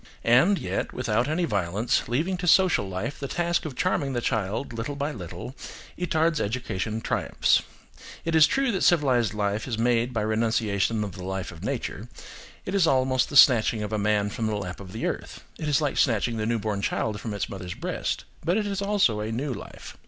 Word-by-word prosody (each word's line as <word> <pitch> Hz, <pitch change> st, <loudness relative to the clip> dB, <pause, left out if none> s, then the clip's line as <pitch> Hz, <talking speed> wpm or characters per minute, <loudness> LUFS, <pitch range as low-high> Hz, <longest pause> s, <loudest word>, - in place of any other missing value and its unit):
And, 135 Hz, -, +5 dB
yet, -, -, -3 dB
without 120 Hz, 0 st, 0 dB
any 165 Hz, +4 st, 0 dB
violence, 100 Hz, -, 0 dB
leaving 155 Hz, +11 st, 0 dB
to 180 Hz, 0 st, -4 dB
social 175 Hz, -, +4 dB
life 95 Hz, +10 st, -4 dB
the 140 Hz, -, -4 dB
task 175 Hz, +3 st, 0 dB
of 145 Hz, -5 st, -5 dB
charming 155 Hz, -6 st, 0 dB
the 120 Hz, -, 0 dB
child 110 Hz, +1 st, -2 dB
little 115 Hz, +5 st, -4 dB
by 140 Hz, +2 st, -2 dB
little, 90 Hz, -, -7 dB, 0.4 s
Itard's 165 Hz, -2 st, +1 dB
education 110 Hz, -1 st, -2 dB
triumphs. -, -, +1 dB, 0.6 s
It 165 Hz, -, -1 dB
is 160 Hz, -2 st, +7 dB
true 270 Hz, -, +1 dB
that 190 Hz, -, -2 dB
civilised 130 Hz, -, +3 dB
life 105 Hz, +2 st, -1 dB
is 115 Hz, -4 st, -2 dB
made 120 Hz, +1 st, +2 dB
by 115 Hz, -3 st, -1 dB
renunciation 110 Hz, -1 st, 0 dB
of 100 Hz, -, -4 dB
the 90 Hz, 0 st, -9 dB
life 95 Hz, 0 st, -4 dB
of 85 Hz, +1 st, -12 dB
nature; 120 Hz, -2 st, -4 dB, 0.6 s
it 185 Hz, -, -4 dB
is 195 Hz, -4 st, +3 dB
almost 130 Hz, -1 st, +2 dB
the 145 Hz, -, +1 dB
snatching 115 Hz, -5 st, +6 dB
of 105 Hz, +1 st, -4 dB
a 105 Hz, -, 0 dB
man 105 Hz, 0 st, +1 dB
from 115 Hz, 0 st, -2 dB
the 110 Hz, -, -1 dB
lap 90 Hz, -3 st, -5 dB
of 95 Hz, 0 st, -10 dB
earth; 115 Hz, -, -4 dB, 0.2 s
it 155 Hz, -, -3 dB
is 150 Hz, 0 st, +2 dB
like 145 Hz, -3 st, -1 dB
snatching 115 Hz, -2 st, +2 dB
the 110 Hz, 0 st, -1 dB
newborn 110 Hz, -3 st, -1 dB
child 105 Hz, +1 st, -1 dB
from 110 Hz, -3 st, -4 dB
its 100 Hz, -, -2 dB
mother's 90 Hz, -2 st, -7 dB
breast; -, -, -3 dB, 0.2 s
but 175 Hz, +5 st, +1 dB
it 215 Hz, -, 0 dB
is 200 Hz, -1 st, -2 dB
also 200 Hz, -, +2 dB
a 105 Hz, +1 st, -3 dB
new 130 Hz, +4 st, -2 dB
life. -, -, -10 dB
120 Hz, 200 wpm, -26 LUFS, 105-150 Hz, 0.6 s, is